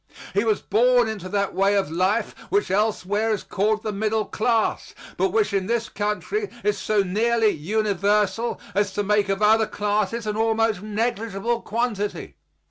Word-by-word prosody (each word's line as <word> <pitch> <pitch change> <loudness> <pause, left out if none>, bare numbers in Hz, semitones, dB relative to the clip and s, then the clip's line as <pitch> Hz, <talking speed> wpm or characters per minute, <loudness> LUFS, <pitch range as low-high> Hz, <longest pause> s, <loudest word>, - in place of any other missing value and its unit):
He 200 - +2
was 220 -3 0
born 245 +1 +3
into 200 -4 -5
that 200 0 -1
way 195 +1 +2
of 195 -6 0
life 185 +7 0 0.2
which 405 - +1
elsewhere 210 +1 0
is 210 - -3
called 215 +2 0
the 215 - -2
middle 215 +1 0
class, 225 0 -1 0.2
but 385 - +1
which 430 - +1
in 190 -1 0
this 230 -1 -1
country 215 - -2
is 420 - 0
so 210 -2 +1
nearly 220 +4 +2
universal 205 +4 0
as 200 -1 0
to 205 - -1
make 205 0 +1
of 195 +2 0
other 220 +1 +4
classes 210 +2 -1
an 210 -1 -2
almost 225 -2 +1
negligible 225 +1 -2
quantity. 215 -3 -3
215 Hz, 160 wpm, -23 LUFS, 200-225 Hz, 0.2 s, other